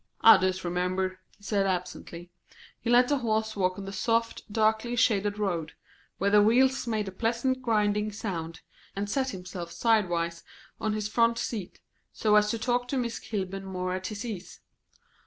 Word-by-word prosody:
"I 225 -2 +9
disremember," 185 0 -1 0.2
he 205 - -25
said 200 -2 +1
absently. 180 -1 -4 0.5
He 230 - -4
let 245 +1 +6
the 285 0 +1
horses 220 -2 -1
walk 185 -2 0
on 200 - -6
the 195 - -6
soft, 230 +2 -1
darkly 220 +2 +1
shaded 205 -3 +2
road, 175 -6 -2 0.4
where 200 +1 +1
the 210 0 +7
wheels 255 +4 +3
made 215 -3 -1
a - - -4
pleasant 235 +6 -1
grinding 210 -3 +1
sound, 170 -6 -5 0.3
and 200 +1 -2
set 265 +5 0
himself 180 -4 -7
sidewise 175 -7 +1 0.4
on 215 -1 -1
his 210 -1 -2
front 230 +1 +2
seat, 225 -5 -5 0.3
so 210 -1 +2
as 210 0 +5
to 230 - -1
talk 245 +1 0
to 270 - -2
Miss 235 -2 -2
Kilburn 195 -3 -4
more 185 -1 -3
at 185 0 -3
his 215 +3 -5
ease. 200 -6 -7
210 Hz, 170 wpm, -28 LUFS, 185-230 Hz, 0.5 s, I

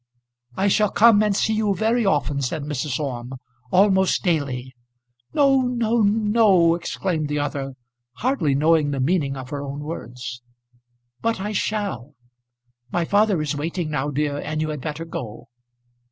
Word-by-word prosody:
"I 195 - +2
shall 210 +1 +3
come 220 0 +5
and 210 -2 +2
see 220 - +1
you 215 -2 +1
very 225 +3 +1
often," 145 -7 +1
said 140 +3 -2
Mrs. 145 -2 -3
Orme, 130 -3 -4 0.4
"almost 190 0 +3
daily." 135 -7 -1 0.6
"No, 275 -2 +4
no, 235 -2 +1
no," 210 -4 +4
exclaimed 170 -1 -2
the 150 0 -2
other, 140 -2 -3 0.4
hardly 170 - 0
knowing 155 +1 +3
the 140 -1 -2
meaning 140 -1 0
of 130 -1 -8
her 145 -1 -3
own 140 +1 -6
words. 125 -5 -7 0.8
"But 230 -3 0
I 205 +2 -3
shall. 200 - -3 0.8
My 175 -1 0
father 205 -3 +2
is 150 0 -2
waiting 160 +2 -3
now, 145 0 -1
dear, 145 0 -1
and 155 +1 -3
you 155 0 -1
had 150 -3 -4
better 155 +4 -5
go." 125 -9 -7
160 Hz, 155 wpm, -22 LUFS, 140-205 Hz, 0.8 s, come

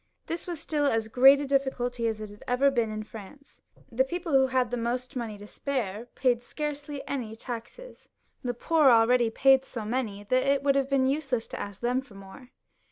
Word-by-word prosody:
This 335 +2 -5
was 345 -3 -4
stiU 290 -2 +1
as 225 -2 -1
great 270 +4 +7
a - - -2
difficulty 250 -3 0
as 220 -1 -3
it 210 -1 -9
always 250 +2 0
had 280 0 +5
been 235 -3 +1
in 215 0 -4
France. 220 +6 -13 0.3
The 245 +3 +3
people 340 +4 -4
who 265 -1 +5
had 255 -2 0
most 245 +2 -3
money 230 -4 -4
to 205 - -11
spare 230 -3 -4
paid 245 -3 +2
scarcely 290 +1 -5
any 235 -6 -4
taxes; 240 - -9 0.3
the 245 -1 -2
poor 315 +5 +2
people 255 -3 +8
already 235 +1 +4
paid 265 +3 +4
so 230 -5 -6
many, 215 -3 -3
that 255 +5 +2
it 275 +1 +1
would 280 -1 +4
have 275 -1 0
been 275 -2 +2
useless 270 -4 -1
to - - -6
ask 200 -1 -7
them 250 +2 +1
for 255 -7 -17
more. 195 +6 -13
250 Hz, 205 wpm, -27 LUFS, 225-275 Hz, 0.3 s, people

